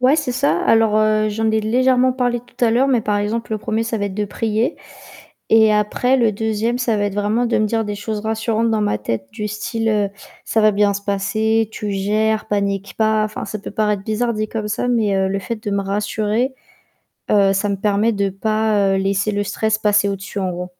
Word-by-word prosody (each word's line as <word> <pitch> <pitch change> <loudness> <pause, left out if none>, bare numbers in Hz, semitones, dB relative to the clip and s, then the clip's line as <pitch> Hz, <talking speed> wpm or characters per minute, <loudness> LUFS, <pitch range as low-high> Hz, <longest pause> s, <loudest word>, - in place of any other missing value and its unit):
Ouais, 260 +4 +4
c'est 290 -5 -1
ça. 275 +3 +1
Alors, 225 -1 +4
heu, 215 0 +2
j'en 220 +1 0
ai 220 0 +1
légèrement 255 +3 +2
parlé 245 -2 0
tout 245 - -14
à 225 - +3
l'heure, 260 +4 +3
mais 250 -3 +3
par 210 -1 -1
exemple, 220 +2 -2
le 215 - -1
1er 220 +2 -2
ça 230 - -2
va 205 - -2
être 190 - -6
de 210 0 -1
prier, 220 +6 -1 0.7
et 220 -1 +6
après, 210 +5 +1
le 230 -4 +2
2e 220 +3 -1
ça 235 -4 0
va 205 - 0
être 200 - -2
vraiment 210 +4 0
de 235 - +1
me 215 - +2
dire 225 +1 0
des 205 0 -4
choses 210 0 -4
rassurantes 225 +1 0
dans 220 -1 +1
ma 105 - 0
tête, 115 +1 -3
du 210 -2 -4
style: 215 -1 -1 0.3
«Ça 220 - +1
va 215 0 +5
bien 200 0 +2
se 200 - -5
passer, 215 +2 0
tu 205 -1 -4
gères, 215 +3 0
panique 200 -1 -1
pas» 215 -1 +2
enfin, 215 +1 -5
ça 215 +1 -5
peut - - -8
paraître 210 -2 0
bizarre 235 +2 -1
dit 215 0 -2
comme 215 -2 -4
ça, 245 +4 -1
mais 220 -5 +1
heu, 190 0 +1
le 195 +1 -1
fait 225 +5 -4
de 205 - -2
me 200 0 0
rassurer, 210 +5 -1 0.8
heu, 200 -2 +4
ça 205 +2 0
me 200 - -1
permet 210 +3 +1
de 200 -1 0
pas, 210 -1 +1
heu, - - +1
laisser 195 +1 0
le 205 - 0
stress 215 +2 -1
passer 210 -1 +2
au-dessus 200 +1 -5
en 185 - -1
gros. 180 +1 -5
215 Hz, 230 wpm, -19 LUFS, 205-225 Hz, 0.8 s, et